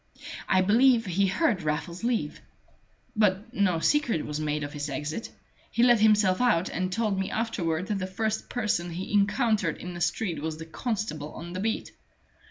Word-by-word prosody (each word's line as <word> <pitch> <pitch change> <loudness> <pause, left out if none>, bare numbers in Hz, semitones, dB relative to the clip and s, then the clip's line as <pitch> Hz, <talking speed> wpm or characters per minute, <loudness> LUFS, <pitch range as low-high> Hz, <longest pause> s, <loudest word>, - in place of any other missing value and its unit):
I 185 -1 +4
believe 230 +4 +4
he 195 +1 +1
heard 210 - +1
Raffles 160 +4 -3
leave. 230 -11 -1 0.7
But 210 +2 +1
no 200 -6 +2
secret 240 - +1
was 150 0 -4
made 150 -1 -1
of 145 - -6
his 145 0 -4
exit: 150 - -4 0.4
he 235 - +1
let 240 -2 +6
himself 210 -2 +4
out 200 -8 +2
and 185 +2 -2
told 210 -1 0
me 190 - -1
afterward 185 -7 -1
that 200 0 -2
the 185 - -3
first 220 +3 -2
person 210 -7 -1
he 180 +4 -5
encountered 205 - +2
in 180 0 -7
the 175 - -7
street 175 -2 -1
was 160 0 -3
the 160 - -8
constable 165 - -4
on 175 +1 -8
the 185 - -4
beat. 220 +3 -2
190 Hz, 180 wpm, -27 LUFS, 165-220 Hz, 0.7 s, let